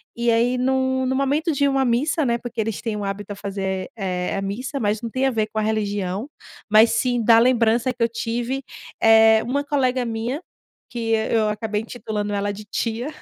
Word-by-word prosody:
E 235 0 +1
aí 240 +2 +2
num 260 0 +1
num 260 - 0
momento 285 +5 +1
de 280 0 +2
uma 270 -1 +1
missa, 290 +6 +1
né, 235 -1 +1
porque 240 -1 -7
eles 220 -1 -3
têm 225 -3 -3
o 205 - -4
hábito 200 +1 -4
a - - -10
fazer, 190 -1 -4
eh 180 -3 -2
eh, - - -2
a - - -2
missa, 245 +8 -4
mas 210 -1 0
não 230 - -3
tem 260 +3 -1
a - - +1
ver 220 -2 0
com 220 - -1
a - - +1
religião, 205 0 -2 0.4
mas 215 +2 +6
sim 240 0 +1
da 225 0 +6
lembrança 240 0 +3
que 240 - -12
eu 230 - +2
tive. 240 +3 -3 0.4
Eh, 220 0 +6
uma 280 +4 -1
colega 260 -3 0
minha, 230 +7 -3 0.5
que 230 -2 -3
e 220 0 0
eu 220 -1 +3
acabei 210 0 -2
intitulando 215 -3 -4
ela 205 0 -1
de 210 +1 -10
tia, 230 +4 -3
230 Hz, 215 wpm, -22 LUFS, 210-255 Hz, 0.5 s, mas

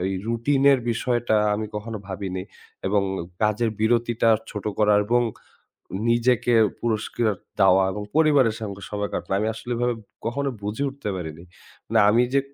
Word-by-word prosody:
এই 95 - -1
রুটিনের 135 +4 +3
বিষয়টা 120 -1 0 0.2
আমি 110 +1 -3
কখনো 110 +1 -5
ভাবিনি। 95 -1 -4 0.4
এবং 100 +1 +2 0.4
কাজের 110 +2 +2
বিরতিটা 115 0 +2 0.2
ছোট 105 -3 -6
করা 105 -1 +4
এবং 120 +3 +2 0.9
নিজেকে 120 +1 +3 0.3
পুরস্কার 110 0 0 0.3
দেওয়া 95 0 +6
এবং 105 - -5
পরিবারের 145 -8 +4
সঙ্গে 100 -2 -6
সময় 105 -1 -3
কাটানো। 95 - -2
আমি 110 - 0
আসলে 120 +2 -6
এভাবে 120 0 0 0.3
কখনো 140 +4 -1
বুঝে 105 +6 -3
উঠতে 135 -5 -7
পারিনি। 85 -1 -7 0.4
মানে 110 0 +3
আমি 120 +3 +4
যে 140 - +5
115 Hz, 145 wpm, -24 LUFS, 105-120 Hz, 0.9 s, দেওয়া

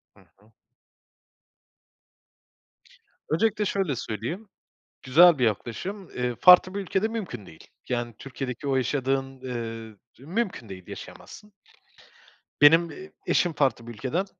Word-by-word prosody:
Hı - - -21 0.2
hı. 105 +3 -26 2.8
Öncelikle 210 +6 +1
şöyle 190 -9 -1
söyleyeyim, 125 - -5 0.5
güzel 165 +5 +6
bir 125 - +2
yaklaşım, 125 - -3
eee, 125 -1 -2
farklı 180 +1 +7
bir 200 - -2
ülkede 195 +3 0
mümkün 185 - -6
değil. 80 - -15 0.2
Yani, 120 -2 -2
Türkiye'deki 135 0 -6
o 135 - +2
yaşadığın, 135 0 -1
ııı, 115 -3 -6 0.2
mümkün 175 - -3
değil, 95 -2 -9
yaşayamazsın. 210 0 -11 1.1
Benim, 165 +3 +7
eee, 190 +5 -11
eşim 175 -2 +2
farklı 135 -5 0
bir 120 - -7
ülkeden, 135 - -2
135 Hz, 115 wpm, -26 LUFS, 120-185 Hz, 2.8 s, farklı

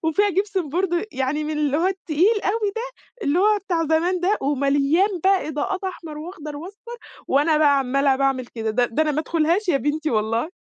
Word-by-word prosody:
وفيها 400 +6 +2
جيبسن 385 -2 -1
بورد، 350 +4 -1
يعني 270 +3 -1
من 305 - -3
اللي 295 -1 +1
هو 335 +4 +1
التقيل 380 +3 +1
أوي 420 0 0
ده، 455 - -2 0.4
اللي 300 0 +1
هو 420 +2 +4
بتاع 335 -3 0
زمان 335 +4 +1
ده، 385 +4 +1
ومليان 285 +6 +2 0.2
بقى 385 -4 +3
إضاءات 370 +6 -3
أحمر 330 -5 -6
وأخضر 305 -3 -8
وأصفر، 405 +9 -9 0.3
وأنا 300 +3 +3
بقى 285 -2 +4
عمّاله 275 +1 +1
باعمل 270 -2 0
كده، 225 -2 -4
ده 245 +3 +2
ده 240 +6 0
أنا 310 - 0
ما 295 - 0
أدخُلهاش 335 +5 0
يا 325 - +4
بنتي 300 +3 -1
والله. 225 +8 -1
315 Hz, 190 wpm, -22 LUFS, 280-375 Hz, 0.4 s, هو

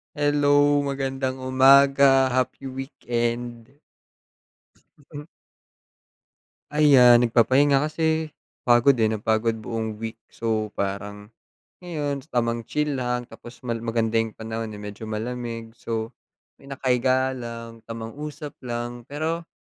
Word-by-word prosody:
Hello! 145 -1 +3
Magandang 135 -1 -2
umaga! 135 +1 +5
Happy 130 +1 -1
weekend! 120 -2 -4 3.0
Ayan 135 -5 +7
nagpapahinga 130 +4 +3
kasi 160 0 -1 0.3
pagod 120 +3 +5
eh, 110 -2 +2
napagod 110 +1 0
buong 110 -1 -4
week 115 0 -5 0.2
so 110 -2 -2
parang 100 +1 -4 0.5
ngayon, 145 -5 -4
tamang 115 -4 -1
chill 150 -2 -1
lang 125 -1 -1
tapos 120 +1 -13
mal 120 -2 -2
maganda 115 0 0
yung 115 -1 -1
panahon 110 0 -5
eh, 105 - -9
medyo 105 +2 -8
malamig. 115 +1 -5
So 115 -1 -3 0.5
ako'y - - -18
nakahiga 130 -1 0
lang, 115 -1 -8
tamang 115 +3 -7
usap 150 -1 -7
lang. 120 0 -5
Pero 160 +3 -3
125 Hz, 105 wpm, -24 LUFS, 115-140 Hz, 3.0 s, Ayan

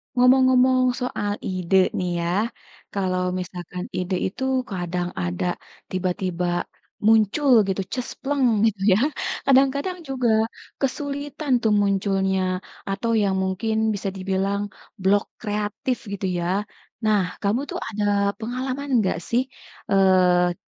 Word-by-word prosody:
Ngomong-ngomong 255 0 +5 0.2
soal 205 -5 -2
ide 185 0 -1 0.2
nih 180 -1 -1
ya, 170 - -1 0.7
kalau 185 -2 0 0.2
misalkan 180 0 -6
ide 185 +1 -1
itu 235 +7 -6 0.3
kadang 180 -1 -2
ada 90 - -2 0.5
tiba-tiba 180 -1 -1 0.6
muncul 225 +6 +4 0.2
gitu, 195 0 0
ces, 250 -2 -3
pleng 280 -1 +1 0.2
gitu 210 -3 0
ya, - - +4 0.5
kadang-kadang 275 +6 +3
juga 255 -2 0 0.5
kesulitan 285 +1 -3
tuh 220 - +2
munculnya 195 -1 +1 0.5
atau 230 +4 -1
yang 195 -1 +1
mungkin 195 +4 -1 0.2
bisa 200 - -4
dibilang 195 +1 -1 0.4
blok 200 +2 +3 0.2
kreatif 210 +5 -2
gitu 200 -1 -3
ya. 170 - -2 0.6
Nah, 210 -2 +4 0.2
kamu 205 +4 +2
tuh - - -3
ada 210 -2 -3 0.4
pengalaman 255 +4 -3
nggak 190 -6 +1
sih, 240 +2 +3 0.5
eee, 180 -2 +4
200 Hz, 115 wpm, -23 LUFS, 185-255 Hz, 0.7 s, Ngomong-ngomong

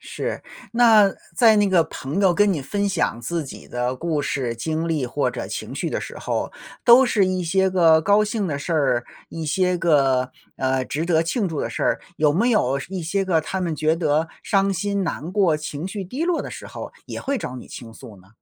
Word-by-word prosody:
是， - - -5 0.3
那 220 -4 +6 0.2
在 225 -3 +6
那 205 -1 +3
个 180 -3 +4
朋 145 +9 -4
友 190 -3 +4
跟 205 +2 +3
你 150 -5 -3
分 200 +8 -1
享 160 -10 -1
自 165 +8 -2
己 135 - -10
的 125 +1 -2
故 155 -1 -1
事、 130 -4 -2
经 160 +7 -2
历 155 -5 0
或 145 +4 0
者 - - -5
情 - - -5
绪 - - -3
的 - - -2
时 - - -8
候， - - -3 0.3
都 245 +2 +8
是 210 -6 +2
一 185 -1 -1
些 190 +3 +2
个 165 -4 +5
高 205 +5 +4
兴 210 -1 -2
的 145 -5 -2
事 165 +4 -4
儿， 135 -6 +1 0.2
一 165 -1 -6
些 180 +4 +1
个， 135 -6 +2 0.3
呃， 130 0 0
值 155 +5 -3
得 165 -2 +2
庆 190 +4 -1
祝 155 -3 -3
的 - - -2
事 - - -4
儿， - - +1 0.2
有 150 -1 +3
没 220 +10 +2
有 140 - +2
是 185 +8 -8
一 180 - -3
些 195 +4 -1
个 170 -4 +2
他 190 +4 -4
们 170 -3 -1
觉 155 +2 +1
得 160 -1 +1 0.2
伤 195 0 +2
心、 200 +1 -1
难 165 0 -4
过、 185 -6 +3
情 150 +2 -5
绪 195 0 -5
低 260 - -3
落 345 -2 +1
的 - - -6
时 - - -9
候 - - -8
也 - - -6
会 280 0 -1
找 130 - -5
你 - - -9
倾 115 -2 -10
诉 110 -3 -12
呢？ 95 - -22
170 Hz, 245 characters per minute, -22 LUFS, 145-195 Hz, 0.3 s, 都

